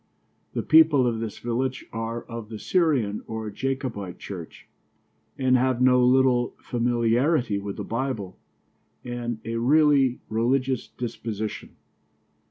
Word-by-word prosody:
The -, -, -2 dB
people 155 Hz, -4 st, +6 dB
of 115 Hz, -2 st, 0 dB
this 110 Hz, -2 st, -5 dB
village 125 Hz, +2 st, -2 dB
are 115 Hz, +1 st, -4 dB
of 115 Hz, -2 st, -8 dB
the 110 Hz, -, -6 dB
Syrian 135 Hz, -, +1 dB
or 110 Hz, -1 st, -5 dB
Jacobite 125 Hz, -7 st, -3 dB
church, 90 Hz, -5 st, -9 dB, 0.7 s
and 130 Hz, -1 st, +3 dB
have 130 Hz, -1 st, +2 dB
no 125 Hz, 0 st, +5 dB
little 125 Hz, -1 st, +3 dB
familiarity 120 Hz, 0 st, +1 dB
with 100 Hz, 0 st, -6 dB
the -, -, -4 dB
Bible 115 Hz, -6 st, -3 dB, 0.7 s
and 120 Hz, -1 st, -4 dB
a 115 Hz, 0 st, -2 dB
really 140 Hz, 0 st, +4 dB
religious 125 Hz, +3 st, 0 dB
disposition. 110 Hz, -3 st, -5 dB
120 Hz, 120 wpm, -25 LUFS, 115-130 Hz, 0.7 s, people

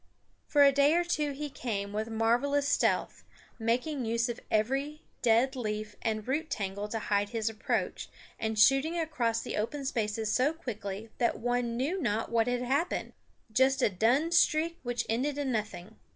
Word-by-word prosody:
For 290 Hz, -1 st, +5 dB
a 280 Hz, -, +7 dB
day 285 Hz, +3 st, +4 dB
or 350 Hz, -, +3 dB
two 300 Hz, -4 st, -1 dB
he 290 Hz, +1 st, -5 dB
came 200 Hz, -6 st, -4 dB
with 215 Hz, +2 st, -2 dB
marvelous 245 Hz, +6 st, +1 dB
stealth, 285 Hz, -, +1 dB, 0.4 s
making 250 Hz, +5 st, 0 dB
use 230 Hz, +1 st, 0 dB
of 235 Hz, -, -4 dB
every 270 Hz, +8 st, 0 dB, 0.2 s
dead 245 Hz, +3 st, +3 dB
leaf 215 Hz, -3 st, -4 dB
and 215 Hz, -1 st, -2 dB
root 310 Hz, +5 st, -1 dB
tangle 200 Hz, 0 st, -3 dB
to 225 Hz, -, -3 dB
hide 205 Hz, -1 st, 0 dB
his 225 Hz, -1 st, -1 dB
approach, 215 Hz, -, -2 dB, 0.3 s
and 220 Hz, -1 st, -2 dB
shooting 270 Hz, +9 st, +4 dB
across 245 Hz, -9 st, 0 dB
the -, -, -5 dB
open 270 Hz, +7 st, -2 dB
spaces 220 Hz, -3 st, -1 dB
so 270 Hz, +5 st, +2 dB
quickly 215 Hz, -7 st, -6 dB
that 235 Hz, -, +1 dB
one 245 Hz, 0 st, -1 dB
knew 320 Hz, +9 st, -1 dB
not 215 Hz, -2 st, -1 dB
what 230 Hz, 0 st, +2 dB
had 245 Hz, 0 st, 0 dB
happened 280 Hz, +7 st, -1 dB, 0.4 s
just 265 Hz, +4 st, +3 dB
a -, -, +5 dB
dun 245 Hz, -, +2 dB
streak 335 Hz, -1 st, +3 dB
which 245 Hz, -1 st, -2 dB
ended 265 Hz, +6 st, -1 dB
in 280 Hz, -2 st, -1 dB
nothing. 215 Hz, -2 st, -4 dB
240 Hz, 170 wpm, -30 LUFS, 220-285 Hz, 0.4 s, a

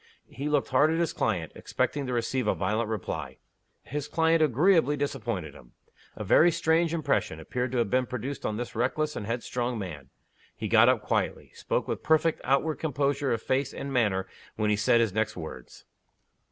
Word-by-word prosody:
He 140 Hz, +3 st, -4 dB
looked 145 Hz, -2 st, +1 dB
hard 145 Hz, +4 st, +4 dB
at 165 Hz, -, 0 dB
his 170 Hz, -2 st, 0 dB
client, 90 Hz, -8 st, -1 dB
expecting 145 Hz, -2 st, -2 dB
to 125 Hz, -, -2 dB
receive 120 Hz, 0 st, -1 dB
a -, -, +2 dB
violent 110 Hz, +1 st, -1 dB
reply. 80 Hz, -10 st, -4 dB, 0.5 s
His 145 Hz, +1 st, -4 dB
client 160 Hz, +2 st, +2 dB
agreeably 155 Hz, -, +3 dB
disappointed 115 Hz, -, -3 dB
him. -, -, -16 dB, 0.4 s
A -, -, -5 dB
very 120 Hz, -, +5 dB
strange 165 Hz, 0 st, +2 dB
impression 145 Hz, -, 0 dB
appeared 125 Hz, +9 st, -3 dB
to -, -, 0 dB
have 115 Hz, -4 st, 0 dB
been 125 Hz, 0 st, +2 dB
produced 130 Hz, +3 st, -5 dB
on 105 Hz, -, -2 dB
this 120 Hz, 0 st, -5 dB
reckless 150 Hz, +6 st, 0 dB
and 105 Hz, -, -5 dB
headstrong 120 Hz, +1 st, -2 dB
man. 75 Hz, -10 st, -7 dB, 0.5 s
He -, -, -4 dB
got -, -, +6 dB
up -, -, +2 dB
quietly; -, -, -1 dB
he -, -, -26 dB
spoke -, -, -2 dB
with -, -, -3 dB
perfect 160 Hz, +1 st, +2 dB
outward 150 Hz, +3 st, +1 dB
composure 140 Hz, -2 st, 0 dB
of 115 Hz, -1 st, -1 dB
face 130 Hz, +1 st, -1 dB
and 140 Hz, 0 st, -5 dB
manner 105 Hz, -7 st, +1 dB, 0.3 s
when 105 Hz, -1 st, +1 dB
he -, -, +3 dB
said 110 Hz, +3 st, +3 dB
his 110 Hz, -5 st, 0 dB
next 110 Hz, -1 st, -1 dB
words. 80 Hz, -7 st, -9 dB
125 Hz, 190 wpm, -28 LUFS, 105-150 Hz, 0.5 s, got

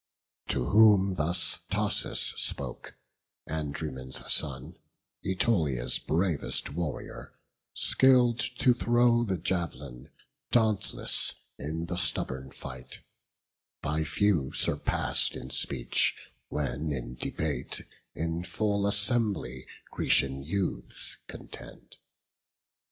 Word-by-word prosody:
To -, -, 0 dB
whom 105 Hz, -3 st, +7 dB
thus 85 Hz, +1 st, -1 dB
Thoas -, -, -1 dB
spoke, -, -, -4 dB, 0.5 s
Andraemon's 70 Hz, -4 st, -3 dB
son, 65 Hz, -2 st, -1 dB, 0.5 s
Ætolia's 80 Hz, -, +1 dB
bravest 85 Hz, -1 st, 0 dB
warrior, 85 Hz, -2 st, -4 dB, 0.4 s
skill'd 125 Hz, -3 st, +5 dB, 0.2 s
to 125 Hz, -, +6 dB
throw 120 Hz, 0 st, +4 dB
The 95 Hz, -5 st, 0 dB
jav'lin, 75 Hz, -7 st, -3 dB, 0.4 s
dauntless 110 Hz, -4 st, +1 dB, 0.2 s
in 80 Hz, +3 st, -2 dB
the 90 Hz, +1 st, -3 dB
stubborn 65 Hz, -7 st, -2 dB
fight; 65 Hz, -2 st, -8 dB, 0.8 s
By 75 Hz, +2 st, +1 dB
few 80 Hz, -3 st, +2 dB
surpass'd -, -, 0 dB
in -, -, -7 dB
speech, 65 Hz, -3 st, 0 dB, 0.3 s
when 75 Hz, +1 st, -1 dB
in 60 Hz, -3 st, -3 dB
debate 75 Hz, +4 st, -3 dB, 0.3 s
In 80 Hz, +1 st, -1 dB
full 100 Hz, +1 st, +1 dB
assembly 100 Hz, -, 0 dB, 0.2 s
Grecian 70 Hz, 0 st, +2 dB
youths 90 Hz, +6 st, -2 dB
contend. -, -, -10 dB
80 Hz, 90 wpm, -30 LUFS, 70-100 Hz, 0.8 s, whom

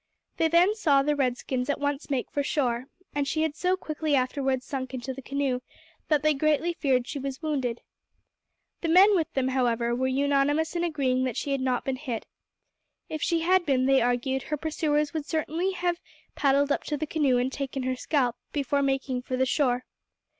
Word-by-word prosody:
They 325 Hz, -, +3 dB
then 345 Hz, +5 st, +4 dB
saw 290 Hz, -10 st, +3 dB
the 295 Hz, +1 st, +1 dB
red 255 Hz, -3 st, +1 dB
skins 255 Hz, +2 st, -3 dB
at 285 Hz, -, 0 dB
once 285 Hz, +1 st, -2 dB
make 270 Hz, -3 st, -2 dB
for 285 Hz, -, 0 dB
shore, 255 Hz, -4 st, 0 dB, 0.3 s
and 285 Hz, -1 st, -1 dB
she 315 Hz, +3 st, 0 dB
had 315 Hz, -2 st, -1 dB
so 365 Hz, +2 st, +1 dB
quickly 310 Hz, -3 st, -1 dB
afterwards 260 Hz, 0 st, 0 dB
sunk 260 Hz, -2 st, -4 dB
into 260 Hz, +1 st, -4 dB
the 270 Hz, -, -9 dB
canoe 275 Hz, -1 st, -1 dB, 0.5 s
that 300 Hz, -2 st, +2 dB
they 310 Hz, 0 st, +4 dB
greatly 310 Hz, +4 st, +1 dB
feared 260 Hz, -6 st, +1 dB
she 285 Hz, -, -4 dB
was 275 Hz, +2 st, -5 dB
wounded. 265 Hz, -6 st, -1 dB, 1.0 s
The 335 Hz, -, -1 dB
men 390 Hz, +5 st, +7 dB
with 330 Hz, -4 st, 0 dB
them, 260 Hz, -1 st, +1 dB
however, 240 Hz, -2 st, +1 dB
were 260 Hz, +2 st, 0 dB
unanimous 285 Hz, +4 st, +1 dB
in 345 Hz, -, 0 dB
agreeing 270 Hz, -6 st, +1 dB
that 250 Hz, -4 st, -3 dB
she 285 Hz, -, -2 dB
had 275 Hz, -1 st, 0 dB
not 255 Hz, -1 st, 0 dB
been 265 Hz, -1 st, -1 dB
hit. 250 Hz, -5 st, -4 dB, 0.8 s
If 310 Hz, -, -4 dB
she 335 Hz, -2 st, +1 dB
had 370 Hz, +2 st, +3 dB
been, 265 Hz, -5 st, +2 dB
they 270 Hz, -1 st, +4 dB
argued, 245 Hz, +2 st, 0 dB
her 300 Hz, +4 st, -3 dB
pursuers 300 Hz, -1 st, 0 dB
would 310 Hz, -2 st, -3 dB
certainly 325 Hz, +4 st, -1 dB
have 350 Hz, -1 st, -1 dB, 0.3 s
paddled 280 Hz, 0 st, +2 dB
up -, -, 0 dB
to 300 Hz, -, -2 dB
the 310 Hz, -, -2 dB
canoe 290 Hz, -5 st, +2 dB
and 255 Hz, +2 st, 0 dB
taken 270 Hz, -1 st, -3 dB
her 255 Hz, 0 st, -1 dB
scalp 250 Hz, -2 st, 0 dB, 0.2 s
before 280 Hz, -1 st, 0 dB
making 270 Hz, -2 st, 0 dB
for 255 Hz, 0 st, -3 dB
the 260 Hz, -, +3 dB
shore. 255 Hz, -2 st, +1 dB
280 Hz, 200 wpm, -27 LUFS, 260-310 Hz, 1.0 s, men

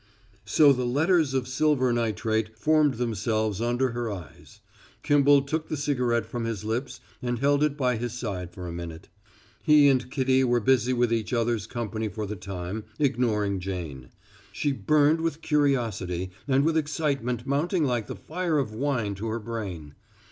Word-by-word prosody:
So 145 Hz, -2 st, +5 dB
the 125 Hz, -1 st, -2 dB
letters 155 Hz, +2 st, +2 dB
of 130 Hz, -2 st, 0 dB
silver 130 Hz, -2 st, +2 dB
nitrate 110 Hz, -1 st, -1 dB
formed 155 Hz, -3 st, +3 dB
themselves 110 Hz, -2 st, -1 dB
under 120 Hz, +2 st, +1 dB
her 120 Hz, -1 st, -3 dB
eyes. 90 Hz, -8 st, -10 dB, 0.4 s
Kimball 145 Hz, -1 st, +5 dB
took 155 Hz, +3 st, -3 dB
the 155 Hz, -, -2 dB
cigarette 125 Hz, -5 st, 0 dB
from 115 Hz, +1 st, -4 dB
his 115 Hz, -4 st, -3 dB
lips 125 Hz, +3 st, -3 dB, 0.2 s
and 120 Hz, -1 st, -1 dB
held 140 Hz, +3 st, +2 dB
it 150 Hz, -1 st, 0 dB
by 125 Hz, -4 st, +1 dB
his 120 Hz, +1 st, -3 dB
side 100 Hz, -8 st, -4 dB
for 90 Hz, 0 st, -8 dB
a -, -, -5 dB
minute. 85 Hz, +1 st, -7 dB, 0.5 s
He 150 Hz, -2 st, +6 dB
and 125 Hz, -2 st, +1 dB
Kitty 130 Hz, -1 st, +2 dB
were 120 Hz, -1 st, +2 dB
busy 125 Hz, +1 st, +2 dB
with 120 Hz, -2 st, +2 dB
each 115 Hz, +1 st, -2 dB
other's 115 Hz, -4 st, 0 dB
company 110 Hz, -2 st, -3 dB
for 105 Hz, +1 st, -4 dB
the 105 Hz, +1 st, -5 dB
time, 95 Hz, +2 st, -5 dB
ignoring 110 Hz, -8 st, +1 dB
Jane. 85 Hz, -9 st, -6 dB, 0.4 s
She 145 Hz, -, -1 dB
burned 150 Hz, +3 st, +3 dB
with 165 Hz, -1 st, -2 dB
curiosity 115 Hz, -, 0 dB, 0.2 s
and 135 Hz, +1 st, +3 dB
with 160 Hz, 0 st, +2 dB
excitement 140 Hz, -6 st, -1 dB
mounting 155 Hz, +5 st, 0 dB
like 120 Hz, -5 st, -1 dB
the -, -, -5 dB
fire 170 Hz, -1 st, -2 dB
of 125 Hz, -7 st, -1 dB
wine 120 Hz, -4 st, -1 dB
to 100 Hz, +3 st, -5 dB
her 110 Hz, +1 st, -2 dB
brain. 100 Hz, -10 st, -6 dB
120 Hz, 170 wpm, -26 LUFS, 110-140 Hz, 0.5 s, He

